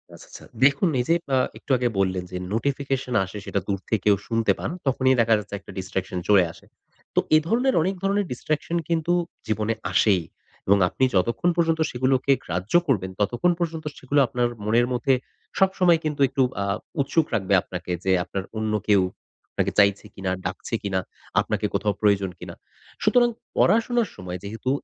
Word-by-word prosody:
আচ্ছা, -, -, -14 dB
আচ্ছা -, -, -12 dB, 0.2 s
দেখুন 145 Hz, +6 st, +3 dB
এইযে 165 Hz, +7 st, +2 dB, 0.2 s
আ -, -, +4 dB, 0.2 s
একটু -, -, -7 dB
আগে 125 Hz, 0 st, +1 dB
বললেন 95 Hz, -1 st, 0 dB
যে, 90 Hz, -, -4 dB, 0.2 s
notification 135 Hz, +1 st, -1 dB
আসে 95 Hz, +3 st, -9 dB
সেটা 100 Hz, -, -1 dB
দূর 100 Hz, -2 st, -1 dB
থেকেও 110 Hz, -, +1 dB
কেউ 105 Hz, -1 st, +6 dB
শুনতে 115 Hz, -1 st, +2 dB
পান -, -, -3 dB, 0.2 s
তখনই 130 Hz, 0 st, +3 dB
দেখা 115 Hz, 0 st, +3 dB
যাচ্ছে 105 Hz, 0 st, -10 dB
একটা 100 Hz, -, -13 dB
distraction 95 Hz, -1 st, -3 dB
চলে 100 Hz, -3 st, +6 dB
আসে। -, -, -18 dB, 0.5 s
তো -, -, +5 dB, 0.2 s
এ -, -, +9 dB
ধরনের 250 Hz, +6 st, +2 dB
অনেক 190 Hz, +4 st, 0 dB
ধরনের 200 Hz, +1 st, +1 dB
distraction 155 Hz, +6 st, -2 dB
কিন্তু 165 Hz, +1 st, +1 dB, 0.3 s
জীবনে 110 Hz, +1 st, 0 dB, 0.2 s
আসেই 95 Hz, -5 st, +3 dB, 0.4 s
এবং 100 Hz, +1 st, +5 dB
আপনি 130 Hz, -, -2 dB
যতক্ষণ 115 Hz, -, +2 dB
পর্যন্ত 165 Hz, -1 st, +2 dB
সেগুলোকে 130 Hz, +2 st, +1 dB
গ্রাহ্য 90 Hz, +4 st, -4 dB
করবেন 95 Hz, -8 st, 0 dB
ততক্ষণ 120 Hz, -, +2 dB
পর্যন্ত 160 Hz, -2 st, -3 dB
সেগুলো 140 Hz, +2 st, 0 dB
আপনার 125 Hz, -2 st, 0 dB, 0.2 s
মনের 115 Hz, +3 st, +3 dB
মধ্যে 135 Hz, +2 st, +2 dB, 0.5 s
সবসময় 185 Hz, -3 st, +4 dB
কিন্তু 150 Hz, -2 st, -2 dB
একটু 135 Hz, -, 0 dB, 0.2 s
আ -, -, -2 dB, 0.4 s
উৎসুক 150 Hz, +3 st, +1 dB
রাখবে 100 Hz, -3 st, 0 dB
আপনাকে 90 Hz, 0 st, -7 dB
যে, 95 Hz, -, +1 dB
আপনার 95 Hz, +1 st, -4 dB
অন্য 110 Hz, 0 st, -1 dB, 0.2 s
কেউ 100 Hz, -2 st, +6 dB, 0.5 s
আপনাকে -, -, 0 dB
চাইছে 100 Hz, 0 st, +3 dB
কিনা 95 Hz, -1 st, -3 dB
ডাকছে -, -, -3 dB
কিনা। 100 Hz, -2 st, 0 dB, 0.4 s
আপনাকে -, -, -2 dB
কোথাও 105 Hz, 0 st, +1 dB
প্রয়োজন 100 Hz, -2 st, +3 dB
কিনা। -, -, -8 dB, 0.5 s
সুতরাং, 245 Hz, -1 st, +4 dB, 0.3 s
পড়াশোনার 230 Hz, +1 st, +3 dB
সময় 90 Hz, 0 st, -6 dB
যেহেতু 110 Hz, +5 st, -4 dB
120 Hz, 170 wpm, -24 LUFS, 100-155 Hz, 0.5 s, এ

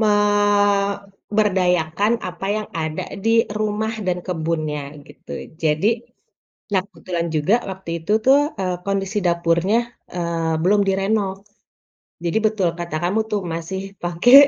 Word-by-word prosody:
memberdayakan 205 Hz, -2 st, +2 dB
apa 180 Hz, +2 st, -5 dB
yang 215 Hz, -, -4 dB
ada 160 Hz, -1 st, -2 dB, 0.2 s
di 230 Hz, +1 st, +4 dB
rumah 215 Hz, +1 st, -1 dB
dan 180 Hz, -1 st, -1 dB
kebunnya 155 Hz, -4 st, -2 dB
gitu, -, -, -12 dB, 0.3 s
jadi 155 Hz, +5 st, +2 dB, 0.9 s
nah, 190 Hz, -, +4 dB
kebetulan 175 Hz, -4 st, -3 dB
juga 150 Hz, +8 st, +3 dB, 0.2 s
waktu 190 Hz, -2 st, -7 dB
itu 165 Hz, +6 st, -2 dB
tuh, 270 Hz, +2 st, +7 dB, 0.2 s
eee, 185 Hz, -1 st, 0 dB
kondisi 195 Hz, +1 st, 0 dB
dapurnya, 170 Hz, +4 st, +2 dB, 0.4 s
eee, 165 Hz, -2 st, 0 dB
belum 205 Hz, +3 st, +4 dB
direnov. 195 Hz, 0 st, +1 dB, 0.9 s
Jadi 170 Hz, +5 st, +2 dB
betul 205 Hz, -5 st, +1 dB
kata 170 Hz, -2 st, -4 dB
kamu 190 Hz, +6 st, +1 dB
tuh, 210 Hz, -, +1 dB
masih 190 Hz, +4 st, -4 dB
pakai 175 Hz, +9 st, +4 dB
190 Hz, 120 wpm, -21 LUFS, 170-205 Hz, 0.9 s, tuh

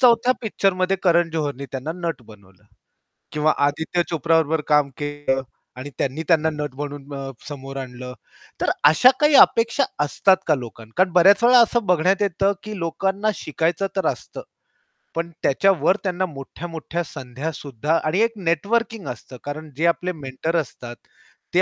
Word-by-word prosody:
4थ्या 245 Hz, 0 st, +5 dB
पिक्चरमध्ये 195 Hz, -3 st, +1 dB
करण 170 Hz, -2 st, +3 dB
जोहरने 145 Hz, -4 st, -3 dB
त्यांना 135 Hz, +4 st, -4 dB
नट 170 Hz, -7 st, -4 dB
बनवलं. 100 Hz, -1 st, -18 dB, 0.7 s
किंवा 155 Hz, +1 st, +2 dB
आदित्य 160 Hz, +4 st, -1 dB
चोप्रा 165 Hz, 0 st, +1 dB
बरोबर 160 Hz, 0 st, +1 dB
काम 150 Hz, -2 st, +4 dB
केलं 145 Hz, -2 st, -2 dB, 0.4 s
आणि 135 Hz, +3 st, -7 dB
त्यांनी 140 Hz, +4 st, -2 dB
त्यांना 160 Hz, -2 st, +3 dB
नट 150 Hz, -2 st, -5 dB
म्हणून 145 Hz, 0 st, -7 dB
अ, 135 Hz, -1 st, -5 dB, 0.2 s
समोर 135 Hz, -2 st, -8 dB
आणलं. 125 Hz, -1 st, -7 dB, 0.5 s
तर -, -, +1 dB, 0.2 s
अशा 205 Hz, +11 st, +6 dB
काही 295 Hz, 0 st, +4 dB
अपेक्षा 230 Hz, +4 st, +5 dB, 0.2 s
असतात 190 Hz, +6 st, +3 dB
का 155 Hz, -, +4 dB
लोकांना? 115 Hz, -4 st, -9 dB
कारण 185 Hz, -1 st, +3 dB
बऱ्याच 195 Hz, +4 st, +6 dB
वेळा 250 Hz, +1 st, +7 dB
असं 235 Hz, -1 st, 0 dB
बघण्यात 180 Hz, +3 st, +2 dB
येतं, 195 Hz, 0 st, +1 dB
की 215 Hz, -1 st, -7 dB
लोकांना 190 Hz, +5 st, -1 dB
शिकायचं 165 Hz, +4 st, -1 dB
तर 190 Hz, -, 0 dB
असतं, -, -, -10 dB, 0.7 s
पण 170 Hz, +1 st, -2 dB
त्याच्यावर 185 Hz, +3 st, +3 dB
त्यांना 185 Hz, -1 st, -1 dB
मोठ्या-मोठ्या 165 Hz, +2 st, -6 dB
संध्यासुद्धा 145 Hz, +1 st, -3 dB
आणि 155 Hz, +5 st, 0 dB
एक 230 Hz, 0 st, +2 dB
नेटवर्किंग 205 Hz, +3 st, -1 dB
असतं. 125 Hz, 0 st, -8 dB
कारण 155 Hz, +2 st, -6 dB
जे 165 Hz, -, +1 dB
आपले 180 Hz, +2 st, 0 dB
मेंटर 150 Hz, +2 st, -4 dB
असतात, 120 Hz, -5 st, -5 dB, 0.6 s
ते -, -, +5 dB
160 Hz, 150 wpm, -22 LUFS, 140-190 Hz, 0.7 s, वेळा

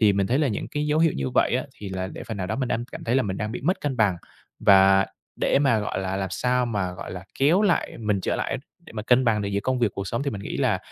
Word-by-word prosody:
Thì 105 Hz, -3 st, +5 dB
mình 100 Hz, -1 st, +1 dB
thấy 125 Hz, +6 st, +1 dB
là 150 Hz, -3 st, +2 dB
những 105 Hz, -, -3 dB
cái 150 Hz, 0 st, -2 dB
dấu 150 Hz, +1 st, +2 dB
hiệu 165 Hz, -1 st, +4 dB
như 65 Hz, -1 st, -2 dB
vậy -, -, +3 dB
á, -, -, -2 dB
thì 100 Hz, -, -7 dB
là 95 Hz, 0 st, -3 dB
để -, -, -8 dB
phần 110 Hz, -, -5 dB
nào 90 Hz, -2 st, -3 dB
đó 110 Hz, -, -2 dB
mình 130 Hz, -2 st, -1 dB
đang 120 Hz, +1 st, -1 dB
cảm -, -, -7 dB
thấy 115 Hz, -, 0 dB
là 135 Hz, -, +3 dB
mình 95 Hz, -2 st, -3 dB
đang 110 Hz, +1 st, -3 dB
bị -, -, -5 dB
mất 175 Hz, +8 st, 0 dB
cân 140 Hz, -3 st, -2 dB
bằng. 100 Hz, -5 st, +3 dB, 0.4 s
Và 95 Hz, 0 st, +6 dB, 0.3 s
để -, -, +3 dB
mà, 135 Hz, -6 st, +3 dB
gọi 105 Hz, -, -2 dB
là, 95 Hz, 0 st, -2 dB
làm 95 Hz, -1 st, -2 dB
sao 125 Hz, 0 st, +1 dB
mà, 100 Hz, -5 st, -2 dB
gọi -, -, -8 dB
là, 90 Hz, 0 st, -7 dB
kéo 160 Hz, +9 st, +4 dB
lại 200 Hz, -5 st, +1 dB
mình 105 Hz, -3 st, 0 dB
trở -, -, -1 dB
lại 135 Hz, -, -2 dB, 0.3 s
để -, -, -12 dB
mà 105 Hz, -1 st, -4 dB
cân 125 Hz, +3 st, +4 dB
bằng 110 Hz, -3 st, +2 dB
được 100 Hz, -, -2 dB
giữa 100 Hz, 0 st, -1 dB
công 130 Hz, +4 st, -1 dB
việc 120 Hz, -, +3 dB
cuộc 100 Hz, -1 st, -4 dB
sống 115 Hz, +4 st, -2 dB
thì 140 Hz, -, -1 dB
mình 100 Hz, -, -5 dB
nghĩ -, -, -4 dB
là 120 Hz, -9 st, +1 dB
110 Hz, 315 wpm, -25 LUFS, 95-130 Hz, 0.4 s, Và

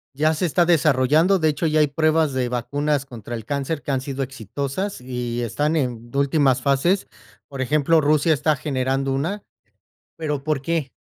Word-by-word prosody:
Ya 155 Hz, +3 st, +2 dB
se 180 Hz, -, -1 dB
está 175 Hz, +1 st, +2 dB
desarrollando. 155 Hz, +3 st, +3 dB
De 160 Hz, -, +2 dB
hecho, 150 Hz, +2 st, -2 dB
ya 155 Hz, -1 st, +2 dB
hay 150 Hz, -, +4 dB
pruebas 155 Hz, 0 st, +1 dB
de 130 Hz, -1 st, 0 dB
vacunas 140 Hz, +4 st, -1 dB
contra 120 Hz, -2 st, -9 dB
el 115 Hz, -2 st, -5 dB
cáncer 145 Hz, +3 st, -2 dB
que -, -, -9 dB
han 135 Hz, -, +1 dB
sido 135 Hz, 0 st, -5 dB
exitosas 135 Hz, -, -4 dB
y 125 Hz, -1 st, -4 dB
están 145 Hz, +7 st, -1 dB
en 120 Hz, -5 st, -2 dB
últimas 140 Hz, -2 st, +2 dB
fases. 140 Hz, +9 st, +1 dB, 0.4 s
Por 135 Hz, -1 st, -6 dB
ejemplo, 150 Hz, +4 st, +3 dB
Rusia 155 Hz, +2 st, +2 dB
está 155 Hz, +1 st, +2 dB
generando 135 Hz, -1 st, -1 dB
una. 165 Hz, +10 st, -2 dB, 0.8 s
Pero, 150 Hz, -4 st, -3 dB
¿por 155 Hz, -2 st, 0 dB
qué? 150 Hz, -2 st, -2 dB
140 Hz, 175 wpm, -22 LUFS, 130-155 Hz, 0.8 s, hay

